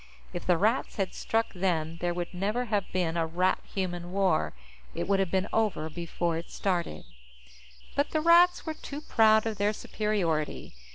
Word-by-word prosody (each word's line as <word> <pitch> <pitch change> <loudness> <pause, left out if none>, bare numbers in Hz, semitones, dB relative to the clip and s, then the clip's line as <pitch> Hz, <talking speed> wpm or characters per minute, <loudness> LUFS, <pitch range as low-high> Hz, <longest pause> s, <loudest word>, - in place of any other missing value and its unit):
If 175 - -5
the 180 -2 +4
Rats 220 +8 +1
had 195 -3 -1
struck 225 0 -1
then, 165 -3 -1
there 175 0 +1
would 175 +1 -4
never 210 +7 -1
have 205 -4 -1
been 175 -3 0
a 165 -1 +1
Rat 180 +3 +1 0.2
Human 175 -2 -3
War. 185 - +1 0.4
It - - -2
would 195 0 +2
have 190 -2 +1
been 190 +1 0
over 195 -8 0
before 170 0 -2
it 170 - -10
started. 180 -4 -2 0.9
But 285 - +1
the 310 - 0
Rats 345 +2 +5
were 315 - -2
too 290 -1 -7
proud 220 -5 +4
of 220 -3 -3
their 205 +1 +2
superiority. 190 -9 -2
190 Hz, 175 wpm, -29 LUFS, 175-220 Hz, 0.9 s, Rats